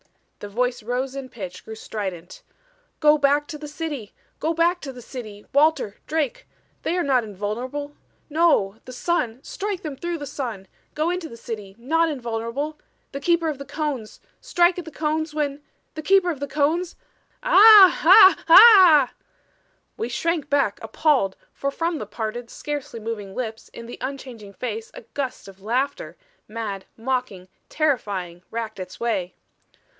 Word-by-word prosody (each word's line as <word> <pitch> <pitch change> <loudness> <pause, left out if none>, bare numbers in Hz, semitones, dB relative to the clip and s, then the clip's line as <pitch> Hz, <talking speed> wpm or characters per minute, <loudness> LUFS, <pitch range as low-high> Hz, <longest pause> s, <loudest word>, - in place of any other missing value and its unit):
The 205 - -8
voice 245 +3 -1
rose 250 +4 -3
in 270 -2 -6
pitch, 185 -6 -8
grew 220 - -8
strident. 190 -6 -6 0.6
"Go 300 -1 +5
back 285 +1 +3
to 300 -3 -7
the 300 - -7
city! 295 -8 -6 0.2
Go 325 +1 -1
back 345 +2 +2
to 275 - -6
the 250 - -11
city! 215 -5 -9
Walter 285 -8 +2
Drake. 305 -5 -2 0.3
They 350 - -1
are 355 - +1
not 260 -3 +2
invulnerable. 240 +8 -5 0.3
No! 295 -11 +2
The 255 - -9
sun 250 -4 -1
strike 405 -2 -4
them 300 -4 -5
through 345 +4 -4
the 290 - -6
sun! 230 -9 -5 0.3
Go 315 +3 0
into 360 -3 -4
the 230 - -11
city 210 -4 -7
not 325 +7 +1
invulnerable 250 +3 -4 0.3
the 275 - -5
Keeper 335 +2 +1
of 290 -3 -5
the 280 - -7
Cones 280 -9 -4 0.2
strike 350 +1 +2
at 350 - -7
the - - -7
Cones 310 0 -2
when 290 -1 -2 0.3
the 310 - -6
Keeper 370 +2 +3
of 295 - -6
the 285 - -3
Cones 305 +5 0 0.5
ah 425 -6 +9
h 380 +3 +8
h - - -19
ah 365 - +8 0.4
" - - -43
We 230 - -3
shrank 320 +4 -1
back 280 -8 +1
appalled, 225 -3 +1 0.2
for 275 - -2
from 330 +2 -2
the 210 - -6
parted, 225 +3 -5
scarcely 290 -5 -5
moving 210 -3 -6
lips 225 -3 -5
in 235 - -10
the 240 - -9
unchanging 255 -6 -7
face 225 0 -5
a - - -8
gust 270 -7 -4
of 195 0 -14
laughter, 260 - -2 0.3
mad, 210 -3 -5
mocking, 230 -6 -3 0.2
terrifying, 200 - -1
racked 225 -3 -5
its 185 0 -8
way. 220 -6 -2
270 Hz, 165 wpm, -23 LUFS, 225-315 Hz, 0.6 s, ah